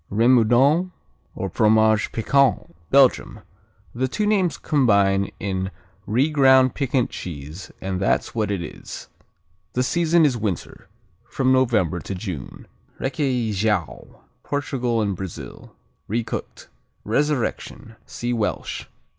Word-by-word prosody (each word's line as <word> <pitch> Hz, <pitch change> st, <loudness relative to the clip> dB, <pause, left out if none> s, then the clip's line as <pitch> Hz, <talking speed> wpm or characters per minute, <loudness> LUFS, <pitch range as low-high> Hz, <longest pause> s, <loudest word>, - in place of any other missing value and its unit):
Remoudon, 125 Hz, -, +4 dB, 0.5 s
or 95 Hz, -, -3 dB
Fromage 110 Hz, +2 st, +3 dB
Piquant 135 Hz, +1 st, +1 dB
Belgium 130 Hz, -6 st, +3 dB, 0.5 s
The 130 Hz, +2 st, -1 dB
two 210 Hz, +11 st, -2 dB
names 195 Hz, -5 st, +1 dB
combine 100 Hz, -8 st, +2 dB
in 95 Hz, -1 st, -2 dB, 0.4 s
re 130 Hz, +9 st, +2 dB
ground 130 Hz, -3 st, +5 dB
piquant 130 Hz, -3 st, 0 dB
cheese, 80 Hz, +2 st, -8 dB
and 95 Hz, -1 st, -3 dB
that's 95 Hz, -, 0 dB
what 110 Hz, -3 st, -1 dB
it 100 Hz, -4 st, -2 dB
is. 80 Hz, -, -9 dB, 0.6 s
The 125 Hz, -, +1 dB
season 170 Hz, +3 st, +3 dB
is 135 Hz, -4 st, +2 dB
winter, 105 Hz, -6 st, -4 dB, 0.4 s
from 130 Hz, -1 st, +1 dB
November 115 Hz, -10 st, +2 dB
to 95 Hz, -, -6 dB
June. 90 Hz, -, -7 dB, 0.3 s
Requeijão 110 Hz, -, -1 dB, 0.3 s
Portugal 125 Hz, -5 st, -1 dB
and 100 Hz, -2 st, -1 dB
Brazil 95 Hz, -1 st, -9 dB, 0.3 s
Recooked. 115 Hz, +2 st, -4 dB, 0.4 s
Resurrection 125 Hz, -2 st, -2 dB
see 120 Hz, +1 st, -3 dB
Welsh. 110 Hz, -3 st, -3 dB
115 Hz, 110 wpm, -22 LUFS, 100-135 Hz, 0.6 s, ground